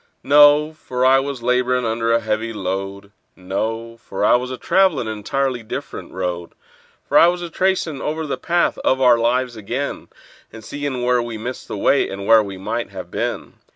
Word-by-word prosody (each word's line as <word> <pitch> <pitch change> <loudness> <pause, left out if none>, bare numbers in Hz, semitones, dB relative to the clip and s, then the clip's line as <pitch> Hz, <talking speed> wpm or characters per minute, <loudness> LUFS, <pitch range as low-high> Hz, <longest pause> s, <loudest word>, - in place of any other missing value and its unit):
No—for 145 -2 +4
I 135 +1 +6
was 135 -3 -5
laborin' 125 0 +1
under 115 0 0
a 115 - +4
heavy 110 +1 -2
load; 100 0 -5 0.2
No—for 110 +2 -4
I - - +5
was 125 +1 -1
travelin' 185 -10 +2
an 110 - -3
entirely 135 +2 -1
different 110 - -7
road; 90 -2 -4 0.5
For - - +5
I 170 - +7
was 175 0 -1
a 170 - -6
tracin' 180 -6 0
over 155 +1 -3
the 140 - -2
path 175 0 0
of 130 - +1
our 125 -3 +5
lives 125 +1 0
ag'in, 120 +7 -4 0.4
And 115 - -11
seein' 140 -1 -4
where 125 0 +2
we 120 -1 -5
missed 125 +4 -6
the - - -5
way, 140 +7 +2
and 100 0 -6
where 110 +1 +6
we 100 -2 -6
might 115 +5 -3
have 95 -3 -9
been. - - -4
120 Hz, 180 wpm, -20 LUFS, 110-140 Hz, 0.5 s, I